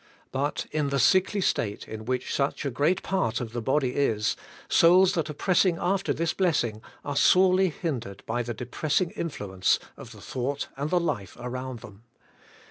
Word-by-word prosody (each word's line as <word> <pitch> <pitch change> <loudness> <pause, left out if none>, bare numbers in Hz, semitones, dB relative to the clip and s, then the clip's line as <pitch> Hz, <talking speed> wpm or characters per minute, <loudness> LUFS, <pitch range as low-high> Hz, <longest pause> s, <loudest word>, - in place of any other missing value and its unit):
But 140 +2 -2
in 150 -2 0
the 140 - 0
sickly 185 - +3
state 105 - -1
in 110 0 -7
which 125 +1 -2
such 140 +1 -1
a 140 - -1
great 155 +9 +1
part 120 - 0
of 115 -2 -6
tile 120 - -3
body 130 +1 +1
is, 110 -6 +1 0.3
souls 180 +3 +5
that 165 -4 -1
are - - -4
pressing 180 +1 +2
after 195 +2 0
this 165 0 0
blessing 145 - 0 0.2
are 145 - -3
sorely 185 +4 +5
hindered 125 - -5
by 120 +2 -1
the 120 -1 -4
depressing 150 - -1
influence 100 - -1 0.2
of - - -11
the - - -12
thought 135 +3 -3
and 140 +3 -3
the 180 - +3
life 125 - -3
around 125 -1 -5
them. 100 0 -13
140 Hz, 175 wpm, -27 LUFS, 120-170 Hz, 0.3 s, souls